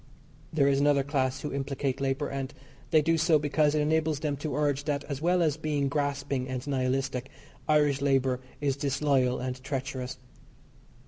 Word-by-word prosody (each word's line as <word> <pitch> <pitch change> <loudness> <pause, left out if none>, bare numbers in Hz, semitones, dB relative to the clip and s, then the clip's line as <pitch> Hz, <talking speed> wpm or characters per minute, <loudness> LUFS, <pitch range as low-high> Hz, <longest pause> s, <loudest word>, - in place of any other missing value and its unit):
There 145 -3 +3
is 140 -1 +3
another 140 -1 +3
class 135 -1 -1
who 150 - -4
implicate 135 -1 -2
labour, 135 +1 0
and 135 0 -4 0.4
they 155 -2 +4
do 165 +1 +2
so 155 0 +4
because 150 0 +2
it 150 - +2
enables 155 -1 +1
them 150 -2 0
to 145 -1 -3
urge 145 -1 0
that 145 -1 -1
as 140 -1 -5
well 175 +1 +3
as 155 -2 +1
being 150 -3 0
grasping 140 -2 -1
and 130 0 -4
nihilistic, 130 -1 -1 0.4
Irish 150 -3 +3
labour 135 -2 +2 0.2
is 140 -2 +1
disloyal 140 -2 +1
and 130 0 -4
treacherous. 130 -2 -4
140 Hz, 170 wpm, -28 LUFS, 135-150 Hz, 0.4 s, they